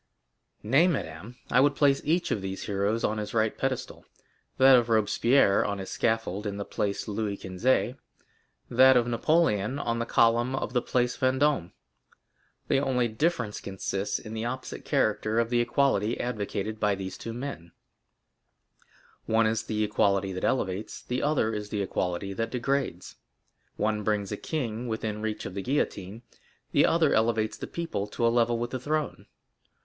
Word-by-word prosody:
0085m - - -7
"Nay, 155 +7 +6
madame; 110 - -4 0.2
I 125 - +5
would 145 +1 +3
place 140 -2 +3
each 170 +4 0
of 105 - 0
these 95 0 -5
heroes 100 +2 -1
on 110 0 0
his 105 +1 -5
right 110 -1 +2
pedestal—that 130 0 0
of 120 -1 +3
Robespierre 110 0 +3
on 100 -1 -2
his 95 -1 -6
scaffold 110 -2 -1
in 100 0 -4
the 100 - -4
Place 100 +1 -2
Louis 105 -1 -2
Quinze; 115 +7 0 0.7
that 130 +1 +6
of 120 - +3
Napoleon 120 - +1
on 115 -4 -2
the 115 - -2
column 120 +3 +3
of 130 - -3
the 125 - +2
Place 125 0 0
Vendôme. 130 - +2 1.0
The - - +3
only 125 -3 +1
difference 115 -2 -1
consists 95 0 -3
in 110 - -9
the 110 0 -3
opposite 130 +2 -5
character 110 +1 +1
of 115 0 +1
the 120 - +3
equality 120 -3 +1
advocated 110 -2 -3
by 105 -2 +2
these 95 -1 -6
two 115 - -7
men; 115 -9 -6 1.6
one 110 0 +3
is 110 0 +1
the 110 -1 -2
equality 100 -2 +1
that 95 - -5
elevates, 100 -4 -1
the 125 +1 -2
other 140 -7 +1
is 105 -1 -4
the 105 -2 -1
equality 95 +1 -2
that 115 +4 -2
degrades; 125 -6 -2 0.6
one 105 0 0
brings 105 -1 -1
a - - -1
king 120 -6 -3
within 110 -2 -3
reach 110 -1 -3
of - - -6
the 100 - -3
guillotine, 110 -4 -2 0.5
the - - +4
other 165 -3 +3
elevates 110 -1 +1
the - - -7
people 165 -12 -3
to 115 +3 -2
a - - +5
level 120 0 +2
with 120 +1 -3
the 130 - -3
throne. 150 +3 -3
115 Hz, 165 wpm, -27 LUFS, 105-130 Hz, 1.6 s, Nay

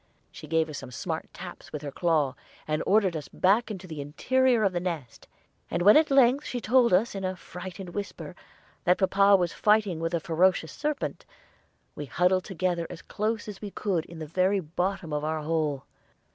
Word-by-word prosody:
She 155 - -11
gave 160 +1 +2
us 150 -3 -6
some - - -9
smart 160 +6 -5
taps 175 0 -10
with 150 -1 -6
her 145 - -5
claw, 155 -5 +1 0.3
and 155 0 0
ordered 195 -4 +3
us 150 - -5
back 205 +6 +2
to 195 -4 -7
the 155 -5 -6
interior 245 - +2
of 195 -2 +2
the 175 - 0
nest; 165 -9 -5 0.4
and - - -1
when 205 +3 +8
she - - +9
at 315 - +1
length 270 +1 +4
told 245 +1 +4
us 190 +6 +3
in 195 -1 -5
a 185 0 -2
frightened 180 +1 -8
whisper 185 -1 -6 0.5
that 180 +1 +4
papa 195 +1 +5
was 175 -3 +1
fighting 210 -5 +2
with 165 +1 -1
a - - +1
ferocious 170 -2 +2
serpent, 300 -1 -3 0.7
we 145 - -6
huddled 180 +4 +2
together 175 -2 -1
as 175 -2 -9
close 215 +1 -2
as 205 -2 -8
we 205 - -5
could 185 -5 -2
in 170 - -11
the 160 - -5
very 185 +5 +1
bottom 175 0 -3
of 150 0 -1
our 155 0 -2
hole. 150 -3 -1
180 Hz, 195 wpm, -27 LUFS, 160-200 Hz, 0.7 s, she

